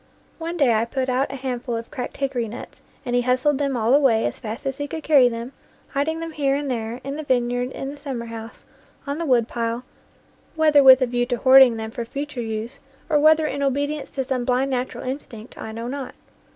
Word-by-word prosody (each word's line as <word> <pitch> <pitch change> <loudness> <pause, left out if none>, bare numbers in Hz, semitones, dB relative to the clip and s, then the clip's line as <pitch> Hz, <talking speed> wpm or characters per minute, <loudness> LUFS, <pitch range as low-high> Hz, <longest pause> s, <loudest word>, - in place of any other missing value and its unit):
One 335 +1 -4
day 270 -7 +4
I 220 +1 +2
put 260 +2 -2
out 260 +2 0
a - - -5
handful 250 -2 -3
of 230 0 -6
cracked 260 -5 -5
hickory 270 -4 -1
nuts, 230 +4 -10 0.2
and 245 -1 -1
he 245 - +3
hustled 255 +3 +1
them 275 -3 0
all 230 +2 +2
away 265 -6 +4
as - - -3
fast 225 +3 -6
as 270 0 -2
he 290 - -2
could 320 +1 -6
carry 275 -5 +5
them, 235 +3 -6 0.4
hiding 305 +4 -1
them 330 0 -5
here 280 -3 0
and 285 -1 -2
there, 230 0 -3
in 275 +2 -5
the - - -3
vineyard, 245 -2 0
in 270 - -5
the 290 - -10
summer 265 -5 -5
house, 225 0 -9 0.4
on 285 +2 -3
the 335 - -2
woodpile, 235 -1 0 0.7
whether 305 -2 +5
with 260 0 +8
a - - +4
view 245 0 -1
to 245 -1 -1
hoarding 260 -2 +7
them 220 0 -5
for 240 -1 -4
future 280 +2 -5
use, 220 +1 -5 0.3
or 300 - +4
whether 310 +1 +5
in 280 -1 -3
obedience 285 +2 -1
to 270 - -3
some 255 -2 -1
blind 255 +2 +1
natural 255 0 -3
instinct, 255 -4 -7
I 220 - -7
know 230 +2 -5
not. 270 +1 -5
260 Hz, 220 wpm, -23 LUFS, 240-280 Hz, 0.7 s, with